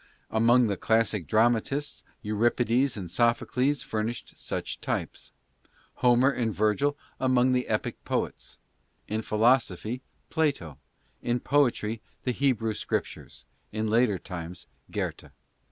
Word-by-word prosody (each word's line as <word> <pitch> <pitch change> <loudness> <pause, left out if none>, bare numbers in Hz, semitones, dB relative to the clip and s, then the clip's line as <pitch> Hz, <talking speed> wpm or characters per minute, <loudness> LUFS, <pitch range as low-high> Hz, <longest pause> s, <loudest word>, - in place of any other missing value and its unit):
Among 120 +3 +5
the 100 -3 -1
classic 110 -5 +1
dramatists 120 +6 +1 0.2
Euripides 120 +4 +1
and 95 - -4
Sophocles 120 - +1
furnished 110 +2 -4
such - - -5
types; - - -4 0.7
Homer 125 +2 +4
and 120 -4 -1
Virgil 110 +8 +1 0.2
among 130 -1 +3
the 125 0 +1
epic - - -2
poets; - - -3 0.5
in 110 +1 -1
philosophy, 115 0 +1 0.3
Plato; 140 - -1 0.4
in 120 +1 0
poetry, 120 -6 +1 0.2
the 125 - 0
Hebrew 120 -4 +1
scriptures: - - -4 0.3
in 110 0 -2
later 115 -3 +3
times, 90 -1 -7 0.2
Goethe. - - -4
115 Hz, 110 wpm, -27 LUFS, 110-125 Hz, 0.7 s, Among